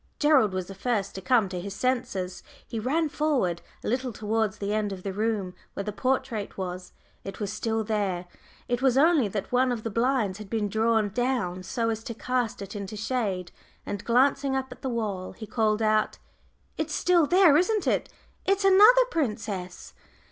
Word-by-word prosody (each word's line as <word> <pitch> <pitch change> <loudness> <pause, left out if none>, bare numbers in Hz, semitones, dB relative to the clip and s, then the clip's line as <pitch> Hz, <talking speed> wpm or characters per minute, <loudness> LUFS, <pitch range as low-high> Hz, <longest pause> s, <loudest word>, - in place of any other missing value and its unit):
Gerald 295 -9 +4
was 185 -1 -3
the 195 - -9
first 205 0 -1
to 190 - -6
come 235 -1 +3
to 180 -1 -4
his 195 +1 -6
senses. 200 -8 -2 0.3
He 230 - -4
ran 305 +8 +1
forward 275 - 0 0.2
a - - -4
little 250 +2 -1
towards 220 0 -1
the 205 0 -2
end 215 -1 0
of 185 -2 -7
the 195 - -3
room 210 -3 -1 0.2
where 200 - -3
the 210 - -3
portrait 235 -2 -2
was 185 -1 -5 0.3
it 195 -1 -7
was 205 -1 -3
still 220 0 -1
there; 200 -5 -1 0.4
it 245 0 -1
was 265 -1 +3
only 305 -4 +5
that 200 0 -4
one 250 +1 +3
of 230 -3 -3
the 225 - -3
blinds 230 -4 +1
had 210 -2 -9
been 215 -2 -1
drawn 220 0 +2
down 225 -5 -1
so 230 +5 -1
as 225 0 -4
to 235 - -5
cast 245 -2 -2
it 200 +2 -9
into 200 +1 -5
shade 205 -6 -2 0.3
and 205 0 -4
glancing 270 +3 +2
up 265 -1 -2
at - - -11
the 265 - -2
wall, 210 -6 -3
he 220 - -8
called 215 0 +1
out, 215 0 +2 0.6
"It's - - -1
still 345 -4 +3
there 355 -3 +6
it - - +6
isn't 415 +3 +1
it. - - +1 0.3
It's 395 +1 +1
another 425 +6 +7
princess." 210 - -3
220 Hz, 190 wpm, -27 LUFS, 200-260 Hz, 0.6 s, another